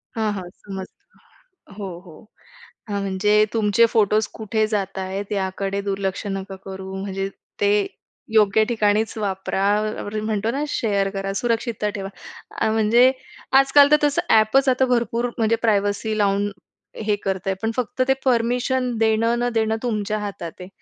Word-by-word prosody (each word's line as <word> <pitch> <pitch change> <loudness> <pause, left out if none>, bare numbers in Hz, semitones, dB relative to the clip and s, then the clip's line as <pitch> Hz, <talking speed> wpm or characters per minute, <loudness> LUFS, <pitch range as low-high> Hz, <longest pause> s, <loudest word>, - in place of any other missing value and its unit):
हां, 220 -2 0
हां. 185 -3 -6
समजतं. 190 0 -12 0.4
हो, 200 -2 -4 0.2
हो. 165 - -12 0.8
हां, 200 -1 -1
म्हणजे 210 +2 +3
तुमचे 220 0 +4
फोटोज 215 0 +3
कुठे 220 0 -1
जाताहेत 195 -1 -3
याकडे 195 0 -2
दुर्लक्ष 195 0 -3
नका 195 0 -7
करू. 190 0 -7
म्हणजे 195 0 -3 0.3
ते 205 0 +4 0.6
योग्य 215 -1 +5
ठिकाणीच 220 -1 +1
वापरा, 195 -2 -2 0.4
आपण 205 +1 -6
म्हणतो 215 +1 0
ना 280 +4 -2
शेअर 200 -8 0
करा, 195 0 -3
सुरक्षितता 230 -2 -1
ठेवा. 195 -1 -4 0.5
अ, - - +3
म्हणजे 225 +4 +5 0.5
आजकाल 280 +1 +6
तर 300 - +7
तसं 290 -1 +2
ॲपच 225 +5 +4
आता 260 +1 +3
भरपूर 240 -1 0
म्हणजे 225 -1 +2
प्रायव्हसी 210 0 +1
लावून 205 0 +1 0.5
हे 210 -1 +2
करतय, 195 0 -1
पण 225 - 0
फक्त 250 +1 -2
ते 265 - +5
परमिशन 250 +1 +1
देणं 225 +1 +2
न 245 0 +1
देणं 220 -1 +1
तुमच्या 215 -3 -1
हातात 200 -5 -5
आहे. 180 - -8
210 Hz, 145 wpm, -22 LUFS, 195-230 Hz, 0.8 s, तर